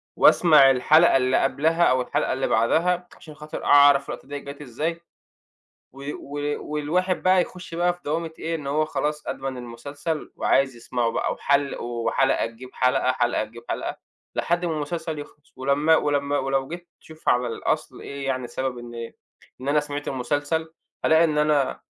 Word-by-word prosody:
وأسمع 150 -6 +6
الحلقة 150 +5 +5
اللي 130 0 +2
قبلها 160 +5 +2
أو 130 -4 +4
الحلقة 125 - -1
اللي 130 - -1
بعدها، 175 +10 +2
عشان 155 - -12
خاطر 150 0 -7
أعرف 145 -1 +6
اللقطة - - -7
ديّة 145 0 -5
جات 140 +1 -9
إزاي، 155 +6 -3 0.9
و 135 +1 -11
و 145 +1 -4
والواحد 180 +5 0
بَقى 185 0 +5
يخش 180 -1 -7
بَقى 175 +1 +2
في 175 - -18
دوامة 160 +2 -2
إيه، 165 +1 -2
إن 150 -4 -6
هو 155 +2 +1
خلاص 150 +1 -3
أدمَن 135 -1 -4
المسلسل 140 +6 -5
وعايز 135 -2 +2
يسمعه 120 0 -1
بَقى - - -1
وحل 140 0 +1
وحلقة 120 +3 0
تجيب 115 +3 -12
حلقة، 130 0 +2
حلقة 120 -3 0
تجيب 115 +2 -13
حلقة، - - -3 0.4
لحد 175 +1 0
ما 165 - -1
المسلسل 155 +1 -4
يِخلَص، 150 0 -13
ولمّا 145 +4 +3
ولمّا 145 -1 0
ولو 135 0 -1
جيت 175 +2 -8
تشوف 160 0 -5
على 125 0 +2
الأصل 115 - -3
إيه 140 0 -6
يعني 130 -2 -2
سبب 130 +1 -3
إن 120 -1 -7 0.5
إن 135 - -6
أنا 150 +1 +3
سمعت 145 0 -5
المسلسل، 145 +5 -2 0.3
هالاقي 160 +1 +5
إن 155 -2 +1
أنا 150 -2 +1
145 Hz, 165 wpm, -24 LUFS, 130-160 Hz, 0.9 s, وأسمع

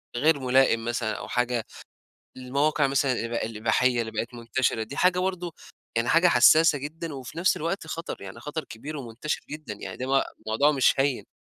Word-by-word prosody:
غير 150 +3 +3
ملائم 130 -3 +3
مثلًا 120 -2 -1
أو - - -7
حاجة 125 -2 -1 0.7
المواقع 140 +4 +1
مثلًا 135 -1 +1
الإب 115 -1 -3
الإباحية 115 +2 +1
اللي 110 -1 -4
بقت 115 +3 -4
منتشرة، 115 0 -1
دي 135 - -8
حاجة 180 0 +3
برضه 180 -3 -2 0.4
يعني 115 +1 +1
حاجة 170 +5 +5
حساسة 155 +3 +6
جدًا، 155 +3 -6
وفي 135 +4 -8
نفس 180 +2 +3
الوقت 165 +2 -3
خطر. 165 +1 -6
يعني 100 +4 -9
خطر 150 +4 -5
كبير 145 +7 -8
ومنتشر 125 +3 -4
جدًا، 150 -8 -6
يعني 95 -2 -8
ده 130 - -4
مو 135 0 +3 0.2
موضوع 125 +7 +3
مش 135 -3 +4
هيّن. 135 -2 0
135 Hz, 180 wpm, -26 LUFS, 120-155 Hz, 0.7 s, حساسة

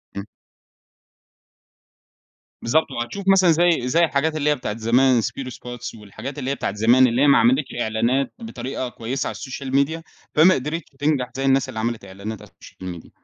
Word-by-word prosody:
امم. 100 0 -5 2.4
بالضبط، 155 +5 +1
وهتشوف 130 +11 -5
مثلًا 190 -3 +5
زي 165 -6 +2
زي 165 +7 +3
الحاجات 155 +1 0
اللي 150 -1 +1
هي 150 - +3
بتاعة 110 -5 -5
زمان، 120 +2 +3
سبيرو 130 +4 -4
سباتس، 120 -1 -8
والحاجات 110 +7 -8
اللي 135 0 -2
هي - - -1
بتاعة 100 - -3
زمان، 120 +5 +5
اللي 120 +2 0
هي 145 - +5
ما 140 - +6
عملِتش 255 +3 +2
إعلانات 120 +5 0
بطريقة 130 - -5
كويسة 120 +3 -4
على - - -5
الsocial 135 0 -6
media 150 +4 +1 0.3
فما 165 +5 +7
قدرِتش 150 +5 -4
تنجَح 145 -4 0
زي 135 +1 -2
الناس 135 0 +2
اللي 115 -4 -5
عملِت 115 -2 -3
إعلانات 100 +3 -7
على - - -14
الsocial 90 -1 -10
media - - -17
130 Hz, 175 wpm, -22 LUFS, 115-150 Hz, 2.4 s, فما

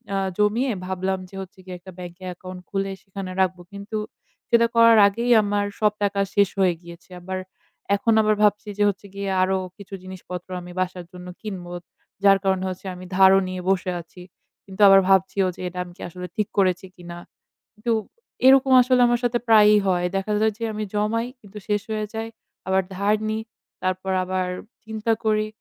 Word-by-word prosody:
আ - - +1 0.2
জমিয়ে 220 +5 +2
ভাবলাম 190 +1 -2
যে 195 - -13
হচ্ছে 190 +1 -11
গিয়ে 185 -1 -7
একটা 185 +2 -12
ব্যাংকে 180 0 -9
account 185 +1 -9
খুলে 195 0 -2
সেখানে 195 -1 -7
রাখবো। 185 -1 0
কিন্তু 200 +2 -5 0.5
সেটা 235 -1 +5
করার 230 -1 +7
আগেই 235 +5 -1
আমার 205 0 0
সব 210 -1 +3
টাকা 200 0 0 0.2
শেষ 200 -2 +4
হয়ে 185 -2 +4
গিয়েছে। 170 0 -13
আবার 190 +1 -4 0.6
এখন 225 +3 +1
আবার 215 0 +2
ভাবছি 210 0 +2
যে 205 - +2
হচ্ছে 200 0 -6
গিয়ে 200 0 -3
আরও 190 +1 +2 0.2
কিছু 200 -1 -12
জিনিসপত্র 185 -1 -8
আমি 180 0 -10
বাসার 185 -1 -3
জন্য 180 0 -10
কিনবো। 185 -5 -6 0.5
যার 195 -1 +7
কারণে 190 -1 +1
হচ্ছে 185 +1 -8
আমি 180 +1 -10
ধারও 190 0 +7
নিয়ে 185 0 -5
বসে 185 -1 +1
আছি। 175 +2 -15 0.4
কিন্তু 190 0 -7
আবার 195 0 +8
ভাবছিও 190 0 +3
যে - - -10
এটা 180 0 -8
আমি 175 -1 -13
কি - - -14
আসলে 180 +1 -7
ঠিক 210 -2 0
করেছি 185 -1 +2
কিনা। 175 -1 -9 0.6
কিন্তু 225 +2 -2 0.5
এরকম 265 0 +6
আসলে 250 0 +3
আমার 240 0 +1
সাথে 240 0 +1
প্রায়ই 210 -1 +7
হয়। 180 -2 +1
দেখা 195 +2 -1
যায় 220 0 +3
যে - - -10
আমি 215 0 -3
জমাই 215 +3 0
কিন্তু 205 -1 -11
শেষ 210 -1 +1
হয়ে 215 -1 -2
যায়। 225 0 -3 0.4
আবার 190 0 +2
ধার 200 +2 +2
নিই 220 0 -2 0.4
তারপর 185 +1 -1
আবার 185 0 -1 0.4
চিন্তা 220 +1 -1
করি। 215 -1 +2
195 Hz, 185 wpm, -23 LUFS, 185-215 Hz, 0.6 s, আবার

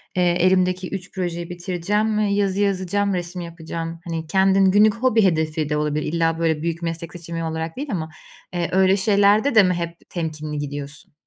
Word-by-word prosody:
eee, 180 - +2 0.2
elimdeki 185 0 +2
3 190 -1 -6
projeyi 175 -2 -3
bitireceğim 185 +5 -1
ve 215 - +2
yazı 200 -1 +1
yazacağım, 200 0 0
resim 175 0 -4
yapacağım. 165 0 -6
Hani, 165 -1 -4
kendin 190 +2 +4
günlük 210 +2 +5
hobi 230 -2 +2
hedefi 155 -4 +1
de 150 - 0
olabilir, 150 +1 -1
illa 165 -1 +1
böyle 160 -2 +1
büyük 165 +1 -2
meslek 165 0 -4
seçimi 170 -1 -6
olarak 160 +2 -4
değil 285 +2 -4
ama, 160 -4 -3 0.4
eee, 175 -1 -1
öyle 190 +1 +4
şeylerde 205 +5 +3
de 215 - +8
mi 180 -1 +2
hep 170 -1 -6
temkinli 155 -3 -4
gidiyorsun? 145 0 -7
175 Hz, 175 wpm, -22 LUFS, 165-195 Hz, 0.4 s, de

